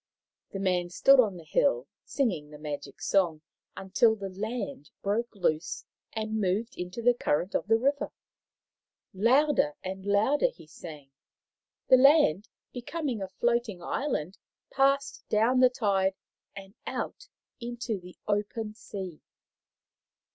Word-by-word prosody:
The - - -6
man 180 -2 0
stood 270 +10 +5
on 210 -7 +3
the 170 - -11
hill, 125 -5 +2 0.2
singing 185 - -1
the 150 - -11
magic 150 -1 -6
song 170 -6 +1 0.3
until 220 +4 +3
the 200 -2 -6
land 200 - -5
broke 220 +4 0
loose 165 -4 -1 0.3
and 220 -1 -2
moved 200 +5 -1
into 180 +6 -6
the 245 +1 +6
current 180 -5 -1
of - - -1
the 225 +1 +5
river. 280 +4 0 1.0
Louder 275 +8 +3
and 190 +1 -5
louder 215 - +3
he - - -15
sang. 150 -3 -11 0.8
The 260 - +8
land, 265 - +5 0.2
becoming 265 -2 -3
a 190 - -3
floating 235 -2 -1
island, 195 - -2 0.3
passed 275 +1 +1
down 225 +4 +3
the 255 0 +7
tide 195 -5 +1 0.4
and 195 0 -10
out 410 - -4 0.3
into 235 -3 -4
the 180 0 -13
open 210 +1 -1
sea. 190 -6 -8
210 Hz, 130 wpm, -28 LUFS, 185-245 Hz, 1.0 s, The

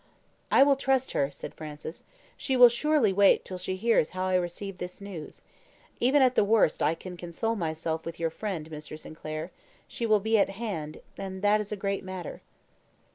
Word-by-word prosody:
"I - - +7
will 280 -1 +4
trust 265 -1 +1
her," 140 - +1
said 140 - -9
Francis. 155 +1 -8 0.3
"She 265 -2 -1
will 245 -1 +10
surely 245 -3 +2
wait 200 +1 +5
till 185 -1 -6
she 185 +1 -3
hears 220 -5 +2
how 185 - 0
I 185 - 0
receive 180 +2 -2
this 180 +2 -6
news. 195 -6 -9 0.6
Even 265 +3 +4
at 255 -1 +4
the 255 - +4
worst 205 -6 +3
I 160 - +2
can 180 +2 -9
console 175 +7 -3
myself 160 -3 -2
with 165 0 -7
your 165 -1 0
friend, 175 -4 -4
Mr. 155 0 -7
Sinclair; 155 +2 -7 0.4
she 230 - -3
will 215 -1 +5
be 220 +2 +2
at 200 - +3
hand, 175 -10 -5 0.2
and 190 0 -6
that 210 +1 +4
is 210 - -7
a - - -1
great 200 0 -2
matter." 185 -3 -7
190 Hz, 190 wpm, -28 LUFS, 165-220 Hz, 0.6 s, will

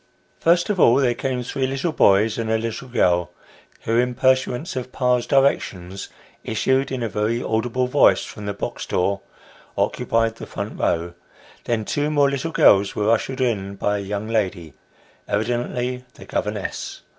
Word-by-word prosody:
First 175 +4 +3
of 195 - -2
all, 120 - +6
there 130 -3 +3
came 130 0 -2
three 130 +2 -2
little 135 +5 -1
boys 105 -3 +3
and 115 -1 -2
a 110 - +2
little 115 +3 -4
girl, 90 -8 +2 0.5
who, 115 +1 +1
in 125 0 0
pursuance 130 +4 +1
of 125 0 -4
pa's 125 -2 +1
directions, 100 -9 0 0.3
issued 130 +5 0
in 130 -2 -2
a - - 0
very 110 +3 -1
audible 120 +3 0
voice 130 +3 +4
from 105 -2 -8
the 100 - -2
box - - -5
door, 100 +2 0 0.6
occupied 115 0 0
the - - -8
front - - -6
row; 85 +1 0 0.5
then 115 -3 -1
two 145 +5 -1
more 145 -2 +3
little 140 +4 -2
girls 100 -9 +4
were 105 +1 +2
ushered 130 +3 0
in 100 -6 -1
by 105 +1 -1
a - - -4
young 100 +2 -4
lady, 95 -8 -2 0.5
evidently 120 +3 -2
the - - -12
governess. - - -4
120 Hz, 165 wpm, -22 LUFS, 105-130 Hz, 0.6 s, all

